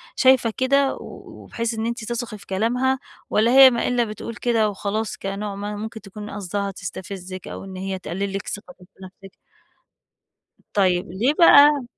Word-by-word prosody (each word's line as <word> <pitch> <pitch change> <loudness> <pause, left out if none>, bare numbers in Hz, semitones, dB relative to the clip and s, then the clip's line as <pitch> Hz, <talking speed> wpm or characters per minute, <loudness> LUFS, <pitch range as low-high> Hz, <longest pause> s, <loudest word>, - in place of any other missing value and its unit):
شايفة 255 -4 +4
كده، 275 +1 +2
وبحيث 230 0 -6
إن 220 0 -3
أنتِ 235 -1 -3
تثقي 235 -2 -4
في 200 - -16
كلامها، 250 +7 0 0.3
والَّا 225 +3 +3
هي 265 0 +9
ما 235 - -1
إلّا 245 -1 +2
بتقول 215 +1 -6
كده 230 -3 +1
وخلاص 205 +1 -3
كنوع 200 +1 -4
ما 205 +1 -5
ممكن 220 +1 -7
تكون 210 +1 -9
قصدها 200 0 -3
تستفزِك 185 0 -7
أو - - -7
إن 190 -1 -9
هي 190 0 -4
تقلّل 195 +2 -4
لِك 195 -1 -4
ثقتِك 205 -3 -8
في - - -29
نفسِك؟ 195 +1 -13 1.4
طيب، 185 -3 +2
ليه 235 +10 +1
بقى 295 -4 +7
210 Hz, 160 wpm, -22 LUFS, 195-240 Hz, 1.4 s, هي